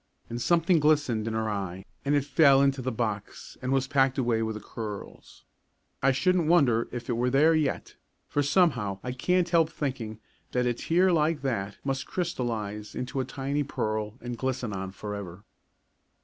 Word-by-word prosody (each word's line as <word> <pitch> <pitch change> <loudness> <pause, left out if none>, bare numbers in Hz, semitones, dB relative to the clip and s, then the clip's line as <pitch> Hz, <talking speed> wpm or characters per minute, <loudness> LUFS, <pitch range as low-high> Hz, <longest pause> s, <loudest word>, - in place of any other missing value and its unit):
And 120 +1 -3
something 170 +2 +3
glistened 145 -8 +2
in 110 - -2
her 110 0 0
eye 95 -3 -4 0.2
and 145 +1 +2
it 140 -1 +1
fell 140 -1 +5
into 135 -1 +2
the 130 +1 -2
box 110 -3 -4
and 130 0 -2
was 135 -1 +2
packed 135 -1 +2
away 120 -3 +1
with 110 -1 -2
the - - -5
curls. 105 -1 -8 0.6
I 135 - +4
shouldn't 175 +4 +2
wonder 135 -9 +3
if 120 -1 -6
it 120 - 0
were 120 +2 +1
there 150 +5 +5
yet, 155 -3 -1 0.3
for 145 - 0
somehow 140 - +2
I 125 - -3
can't 180 +7 +1
help 165 -2 +4
thinking 125 -8 -4 0.3
that 125 0 +1
a 120 - +2
tear 180 +9 +2
like 155 -2 +1
that 105 -7 -2
must 135 -1 -2
crystallise 110 - -3
into 130 +2 -3
a 130 - 0
tiny 140 +3 -2
pearl 110 -6 -2
and 120 0 -4
glisten 130 -4 -2
on 95 0 -4
forever. 100 -2 -7
125 Hz, 175 wpm, -28 LUFS, 110-145 Hz, 0.6 s, fell